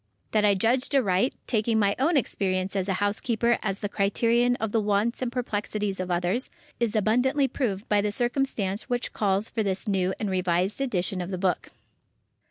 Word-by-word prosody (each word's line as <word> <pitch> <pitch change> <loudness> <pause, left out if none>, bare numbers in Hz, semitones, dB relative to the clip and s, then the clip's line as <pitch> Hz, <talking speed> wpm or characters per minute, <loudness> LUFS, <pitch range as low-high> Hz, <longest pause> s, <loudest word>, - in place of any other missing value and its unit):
That 215 -1 +2
I 205 -1 +4
judged 250 +8 +1
aright, 230 -1 +2
taking 225 -1 +1
my 200 -2 +2
own 310 +4 +3
experience 190 -6 -1
as 195 0 -1
a - - +2
housekeeper 225 +4 +1
as 195 -2 -2
the 205 - -1
criterion 230 +5 +2
of 225 -3 -3
the 225 - +2
wants 210 +4 0
and 250 -2 -1
perplexities 210 -5 -2
of 185 0 -3
others, 180 +8 0 0.3
is 235 -2 0
abundantly 250 +7 +2
proved 215 -8 -2
by 205 -1 +3
the 210 0 -1
circumstance 240 -3 -1
which 245 0 -2
calls 200 0 +1
for 225 - -2
this 195 +1 -1
new 190 -2 +1
and 205 -3 -2
revised 185 +4 0
edition 190 -7 -1
of 180 - -5
the 185 - -3
book. 180 -2 -1
210 Hz, 180 wpm, -26 LUFS, 195-240 Hz, 0.3 s, I